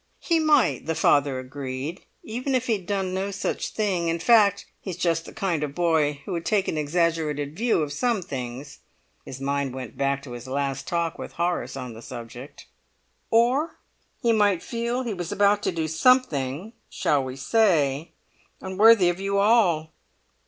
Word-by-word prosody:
"He 335 -1 +1
might," 290 - +2
the 160 - 0
father 145 -4 +3
agreed, 130 +4 -5 0.2
"even 255 +4 -2
if 255 -1 0
he'd 210 -7 -1
done 195 -2 -1
no 190 +1 -2
such 195 -1 -3
thing; 190 -6 -1
in 165 0 0
fact, 200 +1 +4 0.2
he's 185 -4 -6
just 165 -2 0
the - - -10
kind 180 -7 -1
of 145 -1 -4
boy 155 -4 +1
who - - -6
would 170 -2 -2
take 195 +3 +1
an - - -1
exaggerated 155 -2 -1
view 220 -5 +1
of 145 -1 -4
some 230 +3 0
things." 135 -2 -7 0.5
His 130 - -8
mind 140 -1 -2
went 130 -4 -8
back 140 0 0
to 130 - -10
his 120 +1 -8
last 135 0 -2
talk 170 -1 -1
with - - -7
Horace 170 -7 -2
on 125 -3 -6
the 110 - -11
subject. 120 +3 -10 0.6
"Or 245 +8 +2 0.4
he 235 -2 +2
might 205 -5 +2
feel 235 +2 -2
he 235 -3 -3
was 175 -3 -5
about 205 0 +3
to - - 0
do 165 -2 -2
something, 160 - +1 0.2
shall 145 -2 +1
we 130 0 -6
say, 155 -3 +2 0.5
unworthy 195 +1 +5
of 175 +1 0
you 195 0 -1
all?" 200 -7 +3
170 Hz, 175 wpm, -25 LUFS, 140-205 Hz, 0.6 s, unworthy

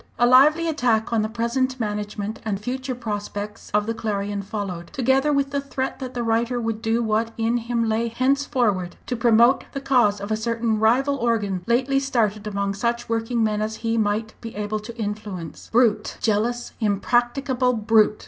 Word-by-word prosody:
A 240 - +4
lively 295 +7 +6
attack 240 -7 +1
on 225 - +3
the 215 - -1
present 250 +3 -1
management 210 0 -3
and 205 -3 -2
future 255 +4 -4
prospects 210 -2 -5
of 210 0 +2
the 230 - -1
Clarion 205 -2 -2
followed, 195 -4 -5
together 265 +3 +2
with 280 -1 +1
the 280 0 -1
threat 265 -1 -4
that 255 -1 -6
the 240 - -1
writer 235 +2 +1
would 225 -1 -3
do 230 +1 +1
what 220 +1 +1
in 230 +1 +1
him 235 -1 -1
lay 220 +1 +1
henceforward 240 -7 0
to 250 - -2
promote 235 +2 +4
the 275 - -3
cause 245 -7 +3
of 200 +2 -6
a - - +3
certain 225 0 -1
rival 260 +6 +3
organ 210 -7 0
lately 260 +3 +2
started, 220 -6 0
among 200 -1 -1
such 235 +3 -2
working 230 +1 0
men 215 -1 0
as 215 +1 -2
he 225 0 +1
might 215 0 0
be 230 -1 -8
able 210 +1 -2
to 230 +3 -10
influence. 205 -6 -5
"Brute! 220 -3 +2
jealous, 230 +3 0
impracticable 245 +4 +1
brute!" 215 -1 +3
230 Hz, 175 wpm, -23 LUFS, 210-245 Hz, -, lively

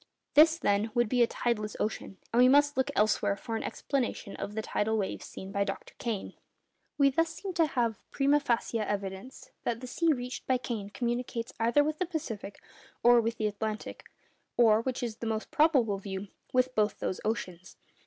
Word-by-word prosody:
This, 315 +2 +7
then, 205 -4 +1
would 240 -1 +3
be 245 +2 +2
a 235 - +6
tideless 215 -4 -2
ocean, 210 -2 -3 0.2
and 240 - +5
we 250 - +8
must 290 +2 +5
look 260 0 +1
elsewhere 210 -1 +2
for 225 +3 -5
an 225 - -2
explanation 255 -7 -3
of 205 - -5
the 220 - -2
tidal 220 +1 0
waves 200 -3 -3
seen 190 0 -8
by 200 0 +1
Dr. 195 -1 -5
Kane. 225 -5 -3 0.6
We 280 -1 +5
thus 330 +4 +2
seem 390 -2 -5
to 335 -3 +3
have 235 -6 -1
primâ 285 +1 +3
facie 235 -3 0
evidence 200 +3 -4
that 230 -1 -1
the 255 - -7
sea 330 +6 +1
reached 250 -3 -4
by 260 - +3
Kane 225 -5 -4
communicates 240 +2 -3
either 235 +6 +4
with 305 +1 -2
the 365 - 0
Pacific 230 - -5 0.4
or 240 0 +7
with 230 0 -2
the 215 - -1
Atlantic, 215 +1 -4 0.5
or—which 235 +2 +3
is 230 -2 -3
the 230 - -4
most 220 0 -3
probable 265 -10 +3
view—with 205 +6 -2
both 210 -3 +1
those 185 - -3
oceans. 190 -5 -4
230 Hz, 185 wpm, -30 LUFS, 210-260 Hz, 0.6 s, we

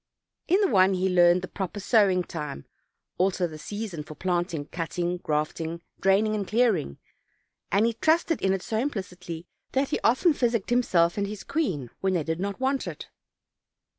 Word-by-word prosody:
In 370 +4 +4
the 400 - +4
one 190 -3 +4
he 185 +1 +1
learned 180 -1 +4
the - - -4
proper 190 +2 -5
sowing 195 -3 +3
time, 150 - -6 0.5
also 185 -1 +2
the 155 -2 -7
season 205 -2 -5
for 155 +1 -10
planting, 175 -4 -1
cutting, 175 +2 -3
grafting, 160 +1 -2 0.2
draining 200 +3 +3
and 205 -3 -2
clearing, 215 - +1 0.7
and 200 +4 +4
he 230 - +1
trusted 325 +6 +1
in 190 - +2
it 190 -1 -1
so 220 -2 -1
implicitly 180 - -4 0.3
that 270 +1 +1
he - - -1
often 260 +8 +4
physicked 235 -5 0
himself 180 -8 +3
and 200 - 0
his 210 0 -7
queen 185 - -2
when 190 -1 +1
they 165 - +1
did 160 +2 -2
not 200 +3 -3
want 265 +1 0
it. - - -7
190 Hz, 170 wpm, -26 LUFS, 175-225 Hz, 0.7 s, In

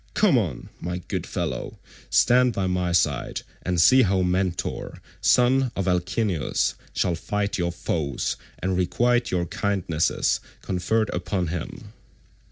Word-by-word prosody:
Come 210 -8 +4
on, 90 - -1
my 90 +1 -3
good 90 - -4
fellow, - - -4 0.3
stand 125 0 +4
by 95 - -1
my 90 -1 0
side 75 -6 +1 0.2
and 90 -1 -1
see 130 +11 +7
how 95 -4 +2
Mentor, 90 0 -2 0.2
son 130 +1 +4
of 95 -1 -2
Alcimus 90 - 0 0.2
shall 90 - 0
fight 100 +4 -2
your 85 0 0
foes 80 -4 -2 0.2
and 95 0 -1
requite 120 +7 +1
your 90 -1 0
kindnesses 85 -4 0 0.2
conferred 100 +4 0
upon 90 0 -2
him." 80 -1 -6
90 Hz, 130 wpm, -24 LUFS, 85-110 Hz, 0.3 s, see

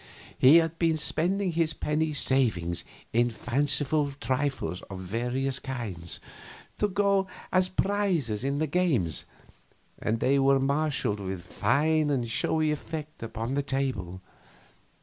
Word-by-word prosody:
He 135 +5 +7
had 165 0 +3
been 165 -2 +2
spending 180 +5 +1
his 165 -1 +1
penny 155 +1 0
savings 110 - +1 0.3
in 120 +1 +3
fanciful 140 +5 0
trifles 130 - -1
of 95 - -6
various 125 +7 -1
kinds, 110 -12 -4 0.6
to 210 - +3
go 200 -1 +2 0.2
as 185 0 +3
prizes 185 - 0
in 140 +1 0
the 155 - +1
games, 145 - +1 0.7
and 110 +1 -1
they 140 +3 +3
were 135 0 +4
marshaled 140 -6 0
with 95 -2 -5
fine 155 - +1
and 130 -5 0
showy 155 +6 +1
effect 155 +1 -6
upon 115 +2 -4
the 145 - +1
table. 130 -10 -2
140 Hz, 130 wpm, -28 LUFS, 115-155 Hz, 0.7 s, He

